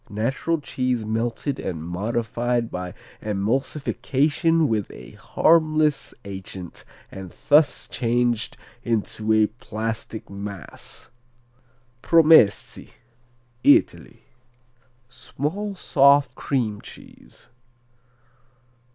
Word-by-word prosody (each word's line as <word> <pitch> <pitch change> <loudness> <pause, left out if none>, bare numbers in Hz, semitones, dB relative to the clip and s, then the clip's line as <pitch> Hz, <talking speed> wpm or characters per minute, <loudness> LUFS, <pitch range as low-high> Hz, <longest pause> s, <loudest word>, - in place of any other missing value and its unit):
Natural 130 +10 -1
cheese 125 -5 -2
melted 115 +5 -2
and 80 -4 -4
modified 115 +6 -2
by 90 0 -5 0.3
emulsification 140 +8 0
with 110 -5 -1
a - - -12
harmless 155 -2 +2
agent 95 -2 -8 0.3
and 95 -2 -9 0.2
thus 145 0 +4
changed 120 -1 0 0.3
into 110 -1 -1
a 110 0 +5
plastic 110 0 -5
mass. 100 +1 -8 0.9
Promessi 160 -10 +4 0.7
Italy 145 - +3 0.8
Small 180 +11 -4
soft 140 -5 +4
cream 115 -7 -2
cheese. - - -14
120 Hz, 75 wpm, -23 LUFS, 105-145 Hz, 0.9 s, a